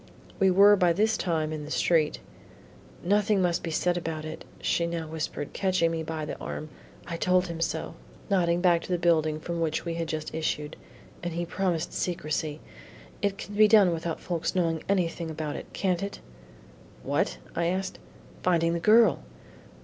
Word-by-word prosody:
We 195 Hz, -1 st, +5 dB
were 200 Hz, +3 st, +7 dB
by 180 Hz, -3 st, +3 dB
this 215 Hz, +5 st, +2 dB
time 160 Hz, -3 st, -1 dB
in 155 Hz, -1 st, -5 dB
the 150 Hz, -, -8 dB
street. 155 Hz, -1 st, +2 dB, 0.9 s
"Nothing 205 Hz, +2 st, +2 dB
must 175 Hz, -2 st, +1 dB
be 165 Hz, -, -4 dB
said 175 Hz, +2 st, +1 dB
about 160 Hz, -2 st, -4 dB
it," 155 Hz, +1 st, -7 dB
she 170 Hz, -, +1 dB
now 170 Hz, -1 st, -3 dB
whispered, 155 Hz, -2 st, -4 dB
catching 185 Hz, -4 st, +1 dB
me 165 Hz, -1 st, -2 dB
by 160 Hz, -1 st, -4 dB
the 150 Hz, -, -5 dB
arm. 155 Hz, -, -6 dB, 0.4 s
"I 170 Hz, -1 st, -4 dB
told 180 Hz, +1 st, +3 dB
him 170 Hz, -2 st, -6 dB
so," -, -, -2 dB, 0.3 s
nodding 175 Hz, -3 st, +2 dB
back 175 Hz, -2 st, +4 dB
to -, -, -8 dB
the 180 Hz, -, +2 dB
building 155 Hz, -3 st, +2 dB
from 170 Hz, +1 st, -4 dB
which 160 Hz, +1 st, -1 dB
we 170 Hz, -, -2 dB
had 165 Hz, 0 st, -3 dB
just 155 Hz, -1 st, -4 dB
issued, 150 Hz, -2 st, -2 dB, 0.5 s
"and 175 Hz, -1 st, -3 dB
he 175 Hz, 0 st, -1 dB
promised 175 Hz, -2 st, -1 dB
secrecy. 155 Hz, -3 st, -2 dB, 0.6 s
It 200 Hz, -1 st, 0 dB
can 205 Hz, -, -8 dB
be 215 Hz, +1 st, +6 dB
done 205 Hz, -5 st, +6 dB
without 165 Hz, 0 st, -3 dB
folks 170 Hz, +1 st, -2 dB
knowing 165 Hz, -3 st, +1 dB
anything 170 Hz, -3 st, 0 dB
about 155 Hz, -2 st, -4 dB
it, -, -, -7 dB
can't 180 Hz, -3 st, 0 dB
it?" 200 Hz, 0 st, -5 dB, 0.8 s
"What?" -, -, 0 dB, 0.2 s
I 170 Hz, -, 0 dB
asked. 190 Hz, +2 st, -2 dB, 0.4 s
"Finding 170 Hz, -2 st, +2 dB
the 170 Hz, -, -1 dB
girl." 215 Hz, +2 st, +5 dB
170 Hz, 180 wpm, -27 LUFS, 160-185 Hz, 0.9 s, were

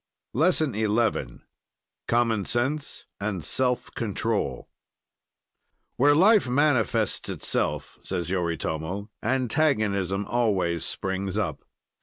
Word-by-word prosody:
LESSON 155 Hz, 0 st, +2 dB
XI 110 Hz, +2 st, 0 dB, 0.7 s
COMMON 115 Hz, -4 st, +2 dB
SENSE 135 Hz, +5 st, -2 dB
AND 100 Hz, -6 st, -3 dB
SELF 125 Hz, -1 st, 0 dB
CONTROL 105 Hz, -, -2 dB, 1.3 s
"Where 145 Hz, +3 st, +5 dB
life 195 Hz, -, +5 dB
manifests 130 Hz, -5 st, +1 dB
itself," -, -, -2 dB
says 85 Hz, 0 st, -3 dB
Yoritomo, 85 Hz, +2 st, -2 dB
"antagonism 110 Hz, -, +1 dB
always 95 Hz, -8 st, +1 dB
springs 95 Hz, +1 st, -2 dB
up." 95 Hz, -9 st, -2 dB
110 Hz, 85 wpm, -26 LUFS, 95-130 Hz, 1.3 s, Where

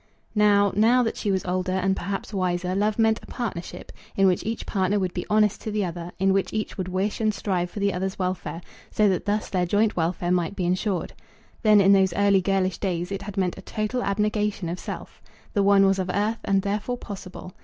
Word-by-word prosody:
Now, 205 Hz, -2 st, +4 dB
now 235 Hz, +4 st, +4 dB
that 225 Hz, -, -1 dB
she 210 Hz, -, -3 dB
was 190 Hz, -1 st, 0 dB
older 185 Hz, 0 st, -1 dB
and 190 Hz, +1 st, +1 dB
perhaps 195 Hz, +2 st, -4 dB
wiser, 180 Hz, -1 st, -1 dB
love 210 Hz, +2 st, +1 dB
meant 225 Hz, -1 st, +3 dB
a -, -, -15 dB
partnership, 190 Hz, -8 st, -5 dB, 0.2 s
in 195 Hz, -, +3 dB
which 185 Hz, -2 st, +2 dB
each 225 Hz, +1 st, -4 dB
partner 195 Hz, 0 st, 0 dB
would 185 Hz, -3 st, -1 dB
be 180 Hz, -, -4 dB
honest 210 Hz, -1 st, +2 dB
to -, -, -4 dB
the 210 Hz, -2 st, 0 dB
other, 175 Hz, 0 st, -6 dB
in 190 Hz, 0 st, +2 dB
which 195 Hz, 0 st, 0 dB
each 215 Hz, 0 st, -3 dB
would 185 Hz, -3 st, -4 dB
wish 190 Hz, +4 st, -2 dB
and 215 Hz, -1 st, +3 dB
strive 185 Hz, -3 st, -2 dB
for 205 Hz, -, -7 dB
the 200 Hz, -1 st, +1 dB
other's 190 Hz, +1 st, -3 dB
welfare, 180 Hz, -2 st, -3 dB, 0.3 s
so 215 Hz, -, +2 dB
that 185 Hz, -, -1 dB
thus 210 Hz, +1 st, -1 dB
their 180 Hz, -2 st, +1 dB
joint 210 Hz, +4 st, +2 dB
welfare 175 Hz, +1 st, -1 dB
might 180 Hz, +1 st, 0 dB
be 180 Hz, -, -2 dB
insured. 185 Hz, 0 st, -1 dB, 0.5 s
Then, 215 Hz, -2 st, +6 dB
in 195 Hz, 0 st, +6 dB
those 190 Hz, -2 st, +4 dB
early 200 Hz, 0 st, +3 dB
girlish 190 Hz, -1 st, 0 dB
days, 180 Hz, -1 st, -2 dB
it 195 Hz, 0 st, -3 dB
had 200 Hz, 0 st, -8 dB
meant 185 Hz, -1 st, 0 dB
a -, -, -8 dB
total 215 Hz, +5 st, -2 dB
abnegation 210 Hz, -2 st, -1 dB
of 175 Hz, +2 st, -4 dB
self. -, -, -8 dB, 0.3 s
The 205 Hz, -, +2 dB
one 195 Hz, 0 st, +5 dB
was 195 Hz, 0 st, +2 dB
of 185 Hz, -1 st, -2 dB
earth, 210 Hz, +4 st, 0 dB
and 195 Hz, -1 st, +2 dB
therefore 210 Hz, +5 st, -2 dB
possible. 190 Hz, -4 st, -9 dB
195 Hz, 220 wpm, -25 LUFS, 185-210 Hz, 0.5 s, Then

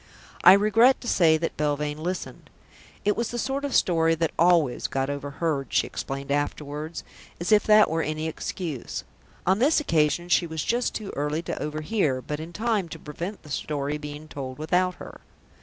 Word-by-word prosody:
I 185 Hz, -, +10 dB
regret 225 Hz, +6 st, +5 dB
to 240 Hz, -, -7 dB
say 160 Hz, -7 st, +4 dB
that 165 Hz, +1 st, -3 dB
Belvane 150 Hz, 0 st, -1 dB
listened. 180 Hz, +3 st, -5 dB, 0.6 s
It 205 Hz, -, +3 dB
was 235 Hz, -1 st, -1 dB
the 240 Hz, -, -4 dB
sort 270 Hz, +4 st, -2 dB
of 285 Hz, -, -2 dB
story 165 Hz, -2 st, +3 dB
that 165 Hz, -1 st, 0 dB
always 165 Hz, -6 st, +3 dB
got 135 Hz, +1 st, -1 dB
overheard, 145 Hz, 0 st, -2 dB
she -, -, +2 dB
explained 135 Hz, +1 st, -5 dB
afterwards, 145 Hz, +2 st, -3 dB, 0.4 s
as 175 Hz, +5 st, -2 dB
if 210 Hz, -1 st, +5 dB
that 215 Hz, 0 st, +6 dB
were 165 Hz, +1 st, 0 dB
any 155 Hz, +1 st, -2 dB
excuse. 160 Hz, -3 st, -5 dB, 0.4 s
On 190 Hz, +3 st, +3 dB
this 290 Hz, +7 st, +4 dB
occasion 165 Hz, -, +1 dB
she 175 Hz, 0 st, +3 dB
was 160 Hz, -2 st, -3 dB
just 240 Hz, +1 st, 0 dB
too 210 Hz, -3 st, -5 dB
early 150 Hz, +3 st, -1 dB
to -, -, -4 dB
overhear, 150 Hz, -1 st, -1 dB
but 150 Hz, +3 st, -5 dB
in 160 Hz, +2 st, -7 dB
time 210 Hz, -2 st, -1 dB
to -, -, -7 dB
prevent 170 Hz, +7 st, -7 dB
the 150 Hz, -, -12 dB
story 145 Hz, +1 st, -2 dB
being 150 Hz, +1 st, -8 dB
told 130 Hz, -4 st, -6 dB
without 180 Hz, +4 st, +1 dB
her. -, -, -11 dB
160 Hz, 180 wpm, -25 LUFS, 150-190 Hz, 0.6 s, I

